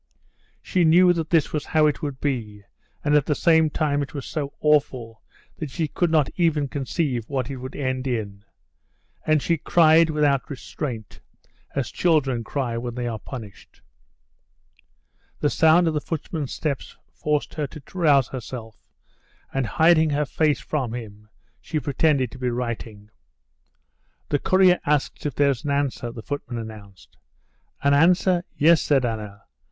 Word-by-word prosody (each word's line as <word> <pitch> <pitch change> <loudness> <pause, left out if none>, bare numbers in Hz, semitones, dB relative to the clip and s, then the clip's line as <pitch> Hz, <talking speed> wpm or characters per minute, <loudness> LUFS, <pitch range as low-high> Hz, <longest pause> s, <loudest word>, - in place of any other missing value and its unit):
She 180 - +1
knew 175 +2 +6
that 165 -2 -3
this 165 -4 +2
was 150 -2 -1
how 155 -1 +2
it 150 +1 0
would 140 -4 -4
be, 110 -8 -3 0.4
and 145 - +2
at 150 -2 +3
the 150 - +1
same 160 0 +4
time 145 -1 0
it 140 +2 -6
was 140 - -5
so 145 -3 -4
awful 130 -7 +1 0.4
that 155 - -4
she 160 +3 -2
could 175 +3 0
not 155 -4 +3
even 160 -5 +2
conceive 135 -3 -2
what 135 -1 -2
it 135 - -5
would 130 +1 -8
end 130 -1 -2
in. 105 -5 -3 0.8
And 155 -2 +3
she 170 - +1
cried 165 +1 +4
without 145 -3 +1
restraint, 125 -5 -6 0.6
as 135 -3 -2
children 140 -9 +1
cry 120 -1 -3
when 120 0 -5
they 125 -1 -3
are 115 -2 -4
punished. 110 -7 -11 1.6
The 145 - +1
sound 165 +2 +4
of 160 - +1
the 150 - -1
footman's 155 -3 -4
steps 145 -4 -4 0.2
forced 150 -1 -1
her 150 -2 -2
to 150 +2 -11
rouse 150 -8 +3
herself, 120 -3 -8 0.7
and, 135 -3 0
hiding 160 +2 +4
her 150 0 0
face 150 -1 +1
from 130 -6 -3
him, 105 -3 -9 0.3
she 155 - -3
pretended 140 -3 +1
to 125 - -11
be 125 -1 -1
writing. 115 -3 -5 1.2
"The 145 - +1
courier 185 +1 +4
asks 150 0 0
if 145 - -5
there's 140 -4 +1
an 145 - -3
answer," 140 -4 -1
the 115 -2 -9
footman 130 -3 -5
announced. 100 -7 -10 0.7
"An 140 0 +4
answer? 175 +3 +4
Yes," 160 +2 +5
said 135 -4 +2
Anna. 105 -3 -5
140 Hz, 160 wpm, -23 LUFS, 120-155 Hz, 1.6 s, knew